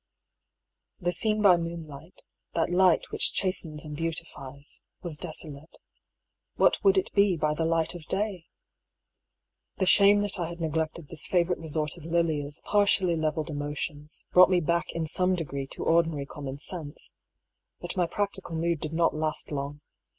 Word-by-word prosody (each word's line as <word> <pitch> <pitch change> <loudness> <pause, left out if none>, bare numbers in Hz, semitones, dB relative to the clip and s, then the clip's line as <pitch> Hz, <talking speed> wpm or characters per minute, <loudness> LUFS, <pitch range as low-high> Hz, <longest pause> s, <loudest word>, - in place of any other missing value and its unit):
The 175 -1 0
scene 215 +2 +1
by 185 -3 +7
moonlight, 165 -1 -7 0.3
that 165 +1 +1
light 180 -1 +3
which - - +2
chas 185 -2 0
tens 155 -2 -6
and 150 -1 -6
beautifies, 145 -3 -5 0.2
was 170 -4 -3
desolate 155 -2 -5 0.4
— - - -58
what - - +3
would 390 -1 +5
it 380 - 0
be 200 -3 +4
by 150 0 +1
the 160 +1 -1
light 165 0 +1
of 170 -3 -9
day? 195 -4 -2 1.3
The 190 - +2
shame 200 +2 +6
that 205 -2 -2
I 170 - -1
had 170 +1 -8
neglected 160 -1 -2
this 160 -3 -2
favourite 180 -1 +1
resort 155 0 -1
of 170 - -12
Lilia's 160 -3 -1
partially 200 -4 +3
levelled 155 0 -1
emotions, 145 +1 -4
brought 185 0 +8
me 185 -1 +3
back 170 +1 0
in 165 -1 -2
some 180 +4 +1
degree 140 -5 -4
to - - -6
ordinary 165 -4 +2
common 140 -1 -7
sense. 150 0 -7 0.7
But - - -4
my 180 -2 +1
practical 200 -3 -3
mood 165 0 0
did 155 +1 -4
not 165 0 +2
last 155 0 -2
long. 145 0 -4
165 Hz, 165 wpm, -28 LUFS, 150-180 Hz, 1.3 s, brought